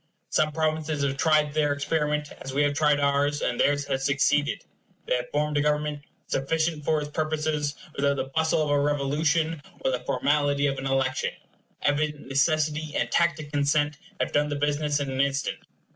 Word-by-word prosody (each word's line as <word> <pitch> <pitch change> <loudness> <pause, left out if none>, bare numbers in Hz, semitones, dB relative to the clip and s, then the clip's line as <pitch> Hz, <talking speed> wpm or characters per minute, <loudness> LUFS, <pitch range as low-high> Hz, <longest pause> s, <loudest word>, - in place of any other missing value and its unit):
Some 155 0 +2
provinces 155 -1 -1
have 135 -1 0
tried 150 0 +2
their 150 -1 +2
experiment, 150 +1 -1
as 135 0 -6
we 145 - +3
have 145 0 +2
tried 150 0 +3
ours; 145 +1 +2
and 120 - -1
theirs 145 0 +2
has 135 -1 -2
succeeded. 140 +1 +1 0.4
They - - 0
have 125 0 -1
formed 150 0 0
a - - +3
government 150 0 0 0.2
sufficient 160 +2 -1
for 155 +1 +2
its 150 0 -5
purposes, 155 -1 -1 0.2
without 140 0 +1
the 135 - -1
bustle 160 0 +2
of 150 - -1
a 145 - +3
revolution 150 +3 +1 0.2
or 130 - +1
the 125 - -1
formality 145 +2 +1
of 135 -1 0
an 135 - -3
election. 135 -1 0 0.5
Evident 150 0 0
necessity 150 +2 0
and - - 0
tacit 165 -4 +1
consent 145 0 +1 0.2
have - - -1
done 150 0 +2
the 145 - -2
business 145 0 0
in 140 -2 -2
an 130 0 +1
instant. 140 0 -1
145 Hz, 180 wpm, -26 LUFS, 140-155 Hz, 0.5 s, we